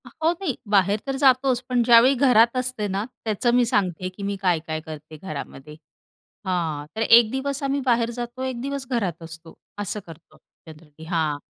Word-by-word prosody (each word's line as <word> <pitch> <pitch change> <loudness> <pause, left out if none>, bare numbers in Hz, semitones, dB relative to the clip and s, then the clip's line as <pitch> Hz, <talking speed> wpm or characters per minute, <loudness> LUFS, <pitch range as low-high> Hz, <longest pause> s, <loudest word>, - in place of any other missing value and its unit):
आ - - -11
हो, 325 - +4
नाही 345 -7 -3 0.2
बाहेर 200 +1 +3
तर 270 - -1
जातोच, 260 -2 +4
पण 250 -1 +2
ज्यावेळी 240 +2 +6
घरात 240 -3 +4
असते 255 -4 -2
ना, 195 +1 -2 0.2
त्याचं 220 +2 +1
मी 245 -1 +4
सांगते 185 -6 -1
आहे 185 - -2
की 185 +2 -11
मी 200 0 -2
काय-काय 165 -4 0
करते 155 0 -10
घरामध्ये 150 -3 -8 0.7
हां, 165 -6 -2
तर 220 - -3
एक 230 0 +6
दिवस 275 +1 -3
आम्ही 275 +1 0
बाहेर 235 -2 +2
जातो, 240 +1 -6
एक 260 -2 -4
दिवस 275 0 -4
घरात 195 - -2
असतो. 165 0 -11 0.3
असं 205 +1 -3
करतो 165 0 -14 0.3
जनरली 155 0 -14
हां. 160 -3 -1
215 Hz, 180 wpm, -23 LUFS, 165-255 Hz, 0.7 s, ज्यावेळी